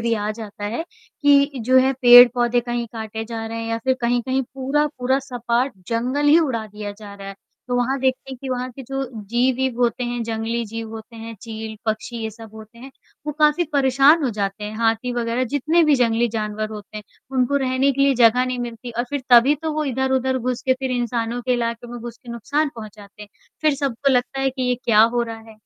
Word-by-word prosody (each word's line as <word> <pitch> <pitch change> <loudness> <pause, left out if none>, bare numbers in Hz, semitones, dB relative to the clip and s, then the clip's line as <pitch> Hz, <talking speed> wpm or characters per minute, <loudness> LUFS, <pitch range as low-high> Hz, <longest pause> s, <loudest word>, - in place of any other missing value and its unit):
भी 230 +1 0
आ 210 0 -2
जाता 210 -2 -8
है, 230 +9 -2 0.4
कि 285 0 +5 0.2
जो 260 +1 +6
है 265 +1 +3
पेड़-पौधे 245 0 +7
कहीं 240 0 -3
काटे 220 -1 -5
जा 225 0 -5
रहे 230 0 -5
हैं 225 - -5
या 230 - -1
फिर 260 0 +3
कहीं-कहीं 245 +2 0
पूरा-पूरा 270 -1 0
सपाट 250 -1 -1 0.2
जंगल 250 +5 0
ही 300 +3 +7
उड़ा 250 -9 -1
दिया 210 0 -7
जा 205 -2 -10
रहा 195 -1 -9
है। 195 - -7 0.3
तो 250 - -1
वहाँ 250 +3 0
देखते 260 0 -1
हैं 265 - -6
कि 270 - -6
वहाँ 255 0 -3
के 265 +2 -10
जो 270 +2 -3 0.2
जीव-ईव 250 +1 0
होते 245 +1 +1
हैं, 240 0 -3
जंगली 230 +1 -2
जीव 225 +1 -6
होते 225 +1 -10
हैं, 225 0 -8
चील, 220 -1 -7
पक्षी 220 +2 -3
ये 220 - -3
सब 220 0 -13
होते 220 +1 -13
हैं, 265 +3 -11 0.4
वो 300 - -2
काफ़ी 300 +3 +4
परेशान 275 +3 +4
हो 255 - +1
जाते 205 -1 -3
हैं, 210 +1 -6
हाथी 225 +2 0
वग़ैरह 240 +1 -1
जितने 315 +5 +3
भी 305 -2 +4
जंगली 235 -1 +2
जानवर 215 -1 -3
होते 210 0 -9
हैं, 210 - -6 0.3
उनको 255 +2 +2
रहने 265 0 +1
के 275 - -3
लिए 275 0 +4
जगह 245 +1 +4
नहीं 255 0 -3
मिलती 240 0 -6
और 240 - +1
फिर 285 -2 -3
तभी 245 +4 +7
तो 320 -1 -2
वो 310 0 -1
इधर-उधर 265 -1 0
घुस 250 0 -3
के 260 - +3
फिर 265 -1 -2
इंसानों 240 -1 -2
के 250 +1 0
इलाके 235 0 -3
में 240 - -6
घुस 235 0 -8
के 240 - -12
नुकसान 285 +7 -1
पहुँचाते 210 -2 -11
हैं, 210 - -12 0.3
फिर 305 -2 +3
सबको 275 -1 0
लगता 255 +2 0
है 270 0 +1
कि 260 0 -5
ये 250 - +2
क्या 215 -2 +5
हो 240 - +2
रहा 225 -1 -6
है? 220 - -16
240 Hz, 220 wpm, -21 LUFS, 225-265 Hz, 0.4 s, पेड़-पौधे